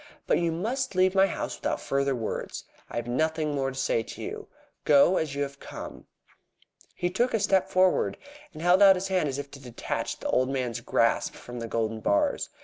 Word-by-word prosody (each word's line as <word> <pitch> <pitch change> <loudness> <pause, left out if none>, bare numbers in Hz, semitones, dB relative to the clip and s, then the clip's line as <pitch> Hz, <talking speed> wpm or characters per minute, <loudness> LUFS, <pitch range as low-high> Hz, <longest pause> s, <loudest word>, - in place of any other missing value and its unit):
But - - +2
you 170 -1 +1
must 230 +8 -2
leave 185 0 +4
my 195 0 +5
house - - -4
without - - -1
further 140 0 0
words. 115 -3 -4 0.3
I - - -9
have 120 - -2
nothing 155 +4 0
more 135 -1 0
to 135 - -8
say 135 -4 +1
to - - -9
you. - - -6 0.4
Go 150 +5 +5
as 150 -3 -2
you 145 - 0
have 140 0 -7
come." - - -9 0.9
He 175 0 -1
took 240 +6 +1
a - - +1
step 190 -2 +2
forward, 185 -1 +2 0.3
and 155 -1 -9
held 180 +2 +5
out 195 -1 +8
his 190 +1 -3
hand 185 -6 +1
as 135 - -3
if 140 -1 -6
to 140 - -11
detach 125 -3 -4
the - - -4
old 130 +1 +2
man's 125 -4 -2
grasp - - +1
from 120 0 -9
the 115 - -4
golden 115 -1 -2
bars. 100 -1 +1
150 Hz, 210 wpm, -27 LUFS, 130-185 Hz, 0.9 s, out